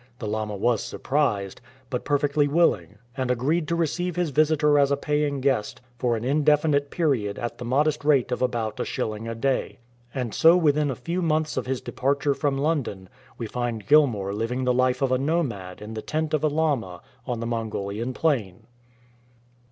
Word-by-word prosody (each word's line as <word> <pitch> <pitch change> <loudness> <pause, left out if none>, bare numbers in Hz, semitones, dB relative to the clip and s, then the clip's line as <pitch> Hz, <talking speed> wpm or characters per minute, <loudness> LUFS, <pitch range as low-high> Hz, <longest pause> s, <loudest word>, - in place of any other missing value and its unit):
The 115 - -6
lama 105 0 -2
was 115 +2 +1
surprised, 125 -10 -1 0.3
but 125 - -3
perfectly 145 0 +2
willing, 105 - +1 0.2
and 130 -2 -2
agreed 145 +7 +1
to 170 - 0
receive 170 +2 -1
his 175 -4 0
visitor 150 0 +3
as 140 -1 +4
a 140 - +1
paying 150 -1 -1
guest 130 -6 0 0.2
for 120 -2 +1
an 110 - -6
indefinite 145 +1 +2
period 130 -13 0
at 120 - -5
the 120 - -5
modest 150 +5 +1
rate 145 -4 +3
of - - -2
about 115 -4 -1
a - - +1
shilling 110 +1 -3
a 115 - -4
day. 135 +3 -1 0.3
And 125 -4 -3
so 165 +2 +6
within 150 -3 +2
a 130 - -2
few 170 +10 -3
months 155 -2 0
of 130 -1 -2
his 130 -1 -2
departure 140 +2 0
from 140 0 -1
London 135 - -2 0.3
we 115 - -4
find 115 -2 -3
Gilmour 115 -9 +3
living 115 +5 -2
the 125 0 +2
life 130 +2 +1
of 135 - +1
a 130 - +2
nomad 125 - -2
in 110 +1 -7
the 110 - -4
tent 155 +3 -2
of 155 - +1
a - - +4
lama 140 - -1 0.3
on 120 -3 -2
the 115 - -3
Mongolian 115 0 -3
plain. 115 - -1
135 Hz, 185 wpm, -25 LUFS, 115-150 Hz, 0.3 s, so